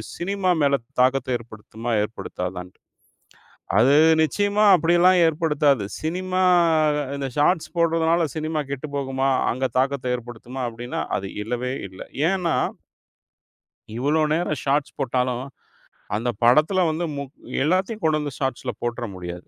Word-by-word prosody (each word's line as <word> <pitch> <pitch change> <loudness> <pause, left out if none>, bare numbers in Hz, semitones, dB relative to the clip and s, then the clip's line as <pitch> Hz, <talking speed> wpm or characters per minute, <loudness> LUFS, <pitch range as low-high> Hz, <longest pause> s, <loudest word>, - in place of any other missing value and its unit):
Cinema 190 +1 -1
மேல 140 -1 +4 0.3
தாக்கத்த 130 0 +2
ஏற்படுத்துமா, 115 0 -8
ஏற்படுத்தாதான்ட்டு. 90 -4 -6 1.0
அது 130 +5 +5 0.3
நிச்சியமா 205 +6 +1
அப்படியெல்லாம் 175 +2 +4
ஏற்படுத்தாது. 150 - +2 0.2
சினிமா, 185 +3 -1 0.7
இந்த 140 -1 -3
ஷார்ட்ஸ் 160 +4 +1
போடுறதுனால 165 0 +2
சினிமா 155 -1 -2
கெட்டுப்போகுமா, 135 -1 -2 0.2
அங்க 130 +2 -1
தாக்கத்த 130 -2 0
ஏற்படுத்துமா 120 +2 -7
அப்படின்னா, 120 +2 -5
அது 95 +1 -4
இல்லவே 125 +3 -3 0.2
இல்ல. 95 0 -10 0.3
ஏன்னா 180 -4 0 1.4
இவ்ளோ 150 +5 +1
நேரம் 155 -2 -1
ஷார்ட்ஸ் 140 +1 0
போட்டாலும், 125 0 -1 0.7
அந்த 120 +3 -1
படத்துல 155 +10 +4
வந்து 160 +2 -2
முக் 140 -1 -6 0.3
எல்லாத்தையும் 190 +7 0
கொண்டு 155 -1 +2
வந்து 145 -2 -4
ஷாட்ஸ்ல 135 -3 -2
போட்ர 120 0 -3
முடியாது. 90 0 -8
140 Hz, 115 wpm, -23 LUFS, 120-165 Hz, 1.4 s, அது